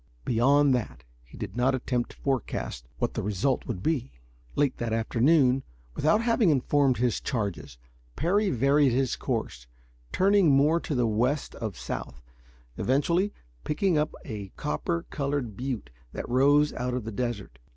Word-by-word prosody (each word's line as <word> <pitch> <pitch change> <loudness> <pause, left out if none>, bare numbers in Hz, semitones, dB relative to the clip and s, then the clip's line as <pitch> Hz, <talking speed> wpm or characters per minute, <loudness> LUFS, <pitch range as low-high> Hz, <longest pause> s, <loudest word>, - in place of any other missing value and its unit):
Beyond 140 +4 +4
that, 125 -3 -3 0.2
he 60 - -15
did 105 -3 -6
not 130 +2 +2
attempt 125 -1 -2
to - - -15
forecast 120 - -3
what - - -1
the - - -2
result 105 +6 -1
would 100 -6 -4
be. 135 -4 -1 0.4
Late 145 -3 +1
that 115 -2 -2
afternoon, 125 +4 +3 0.3
without 210 +10 +2
having 230 -4 +3
informed 140 -2 +2
his 120 -1 0
charges, 100 - -3 0.4
Parry 200 +5 +1
varied 140 -1 +3
his 130 0 +1
course, 60 0 -4 0.4
turning 195 -2 +4
more 145 +4 +4
to 150 - -4
the 125 -1 +2
west 125 +6 0
of 110 -7 -5
south, 60 +1 -6 0.6
eventually 170 +10 +1 0.3
picking 175 - +1
up 150 +1 0
a 105 -5 -6
copper 85 +3 -2
colored 140 -6 -2
butte 125 - -4 0.2
that - - -5
rose 145 +4 +4
out 125 0 -2
of 125 - -3
the 110 - -5
desert. 105 - -4
130 Hz, 150 wpm, -27 LUFS, 115-145 Hz, 0.6 s, Beyond